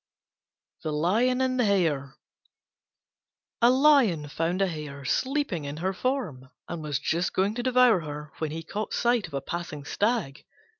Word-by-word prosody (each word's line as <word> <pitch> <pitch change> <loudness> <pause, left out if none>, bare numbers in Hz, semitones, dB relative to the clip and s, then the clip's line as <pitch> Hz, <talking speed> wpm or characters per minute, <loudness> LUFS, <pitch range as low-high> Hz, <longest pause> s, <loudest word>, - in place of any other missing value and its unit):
THE 155 - -3
LION 220 +12 +2
AND 255 -1 0
THE 245 - +3
HARE 155 -9 +1 1.5
A 235 - +7
Lion 255 - +4
found 165 +5 -1
a 195 - +3
Hare 150 -5 -6
sleeping 260 - -1
in 140 +1 -5
her 185 +4 -1
form, 190 - -3 0.2
and 170 -2 -5
was 150 -2 -2
just 170 +6 -1
going 195 +3 +1
to 245 - -3
devour 250 -4 +4
her 150 -1 -7
when 155 - -1
he 165 +2 -5
caught 210 +6 -4
sight 240 -2 +1
of - - -8
a 135 - -1
passing 170 -4 -5
stag. 205 - -1
175 Hz, 160 wpm, -27 LUFS, 150-240 Hz, 1.5 s, A